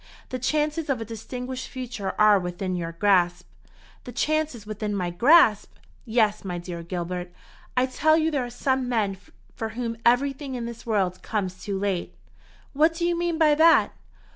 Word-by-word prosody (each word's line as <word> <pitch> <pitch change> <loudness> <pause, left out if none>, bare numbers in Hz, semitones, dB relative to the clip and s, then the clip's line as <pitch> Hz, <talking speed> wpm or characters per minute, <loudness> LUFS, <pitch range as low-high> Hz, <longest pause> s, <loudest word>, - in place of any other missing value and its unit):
The 255 - -4
chances 300 +4 -1
of 265 -4 +1
a 225 - -5
distinguished 250 +3 -6
future 235 -6 -5
are 210 -1 +6
within 180 +1 -3
your 170 -1 -4
grasp." 175 -1 +2 0.6
"The 245 - -8
chances 300 -2 -1
within 210 -1 -3
my 180 -3 -2
grasp! 230 - +4 0.3
Yes. 220 -3 +1
My 180 -3 -4
dear 175 -1 -6
Gilbert, 175 +1 -4 0.5
I 250 - +4
tell 310 +4 +3
you 320 0 +1
there 280 -4 0
are 245 - -5
some 260 +1 -1
men 210 -5 0 0.4
for 225 - -4
whom 230 0 -4
everything 270 +2 +1
in 240 -1 -4
this 235 0 -8
world 190 -5 0
comes 185 -4 -3
too 200 -2 -2
late." 190 - -2 0.6
"What 315 +3 +3
do 340 +1 -1
you 345 0 +1
mean 340 -1 -1
by 310 -2 +5
that?" 325 +2 +5
230 Hz, 170 wpm, -25 LUFS, 195-275 Hz, 0.6 s, are